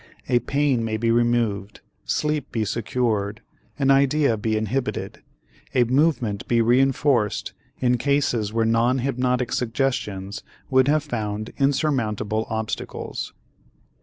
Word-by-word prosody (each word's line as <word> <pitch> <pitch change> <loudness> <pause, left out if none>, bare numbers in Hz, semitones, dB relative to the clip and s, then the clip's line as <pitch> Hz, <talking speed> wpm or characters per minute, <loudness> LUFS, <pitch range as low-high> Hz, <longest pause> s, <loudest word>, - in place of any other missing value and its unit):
A 120 -1 +3
pain 140 -1 +1
may 110 -1 -1
be 115 +1 +1
removed, 115 -4 0 0.2
sleep 150 -2 -1
be 110 -2 -1
secured, 110 -2 -1 0.3
an 135 -1 +3
idea 140 -2 +3
be 110 0 -1
inhibited, 115 +5 -3 0.5
a 125 - +5
movement 125 -5 +1
be 120 - +2
reënforced 125 -1 +2 0.3
in 125 -1 +1
cases 125 -6 +1
where 115 0 +1
non 115 +3 +2
hypnotic 125 -1 0
suggestions 110 -6 -2 0.3
would 130 0 +4
have 150 0 +3
found 110 -5 -4
insurmountable 115 -7 0
obstacles. 110 -1 -4
120 Hz, 115 wpm, -23 LUFS, 110-135 Hz, 0.5 s, a